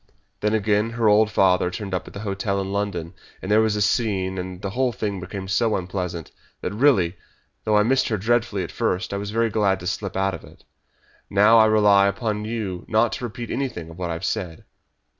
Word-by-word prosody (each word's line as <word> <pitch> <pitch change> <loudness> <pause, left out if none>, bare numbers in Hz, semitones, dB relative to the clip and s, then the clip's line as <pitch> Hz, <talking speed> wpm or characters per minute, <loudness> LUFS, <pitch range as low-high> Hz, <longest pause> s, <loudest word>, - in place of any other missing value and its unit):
Then, 105 +1 +1
again, 105 +1 +1
her 115 -1 0
old 105 +1 +5
father 90 -3 +3
turned 95 +1 -6
up 90 - -2
at - - -11
the 100 - -6
hotel 100 -1 -2
in 95 0 -3
London, 100 -4 -3 0.3
and 95 - -5
there 110 +1 +5
was 110 -1 +1
a 105 - +1
scene, 95 -4 0
and 90 0 -6
the 100 0 -4
whole 130 +3 +1
thing 105 -3 -3
became 95 +1 -6
so 110 +3 +1
unpleasant 90 -3 -4 0.3
that 90 - -3
really 105 -8 +3 0.5
though 105 -1 +3
I 105 - +5
missed 130 +4 +2
her 110 - 0
dreadfully 110 -1 0
at 85 - -7
first 90 +3 -1
I - - -1
was 100 0 -4
very 115 +1 0
glad 100 -2 +1
to - - -8
slip 95 +1 -3
out 95 0 +1
of 80 - -7
it. - - -16 0.7
Now, 105 +3 +6
I 110 - +7
rely 105 -2 +5
upon 105 +1 -2
you 105 -6 -4
not 110 +1 +3
to - - -5
repeat 120 +1 -6
anything 90 -12 -4
of 80 - -12
what 90 -2 -3
I - - -1
have 85 +3 -5
said." 90 -6 -3
100 Hz, 220 wpm, -23 LUFS, 95-110 Hz, 0.7 s, I